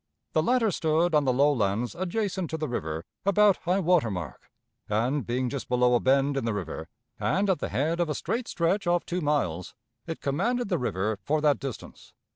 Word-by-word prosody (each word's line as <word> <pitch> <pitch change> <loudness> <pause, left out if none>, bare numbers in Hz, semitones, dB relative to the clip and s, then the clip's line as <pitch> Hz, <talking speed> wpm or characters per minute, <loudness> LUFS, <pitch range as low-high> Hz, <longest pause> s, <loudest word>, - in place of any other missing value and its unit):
The 155 - +3
latter 230 +3 +2
stood 160 +1 +1
on 150 -2 +4
the 130 - +3
low 140 +4 +4
lands 110 0 0
adjacent 185 -1 -2
to 160 - -3
the 155 -1 -2
river 80 -8 -4 0.2
about 200 0 +4
high 180 +2 0
water 170 -8 +3
mark, 90 - -6 0.4
and, 120 +7 +1
being 125 +2 0
just 140 +1 -5
below 125 0 +3
a 120 - +4
bend 135 +2 +2
in 135 - -1
the 115 -2 -1
river 80 -4 -5 0.3
and 200 +2 +1
at 185 - 0
the - - -3
head 160 +5 0
of 170 -2 +1
a 150 - -1
straight 235 - -2
stretch 175 +3 0
of 175 0 +2
two 180 +1 -2
miles, 115 - -1 0.3
it 165 - -4
commanded 215 - -1
the 175 -5 +1
river 105 -3 -1
for 155 +1 0
that 150 -2 +3
distance. 135 -4 -8
150 Hz, 205 wpm, -27 LUFS, 120-175 Hz, 0.4 s, on